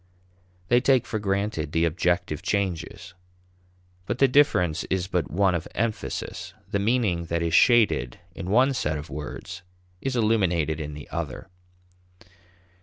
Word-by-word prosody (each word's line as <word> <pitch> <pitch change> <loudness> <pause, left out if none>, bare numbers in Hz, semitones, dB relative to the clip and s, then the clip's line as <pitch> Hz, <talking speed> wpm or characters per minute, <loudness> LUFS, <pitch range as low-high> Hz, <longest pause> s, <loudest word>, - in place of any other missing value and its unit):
They 120 +1 +5
take 130 -1 +3
for 110 - -3
granted 100 -6 -2
the 80 +1 +3
objective 85 -1 0
changes. 95 -3 -3 0.9
But 120 - -2
the 135 - +5
difference 90 - +3
is 95 -2 -1
but 90 -3 -1
one 95 +3 +2
of 85 -1 -2
emphasis; 115 -3 -3
the 100 - -1
meaning 100 -6 +1
that 85 0 -1
is 85 -1 -1
shaded 105 - +4 0.2
in 95 0 -6
one 130 +6 +4
set 80 - -1
of 75 0 -8
words 75 +4 -7 0.4
is 135 -1 -2
illuminated 90 -9 +1
in 75 -1 -6
the 75 - -9
other. - - -5
90 Hz, 140 wpm, -25 LUFS, 80-110 Hz, 0.9 s, They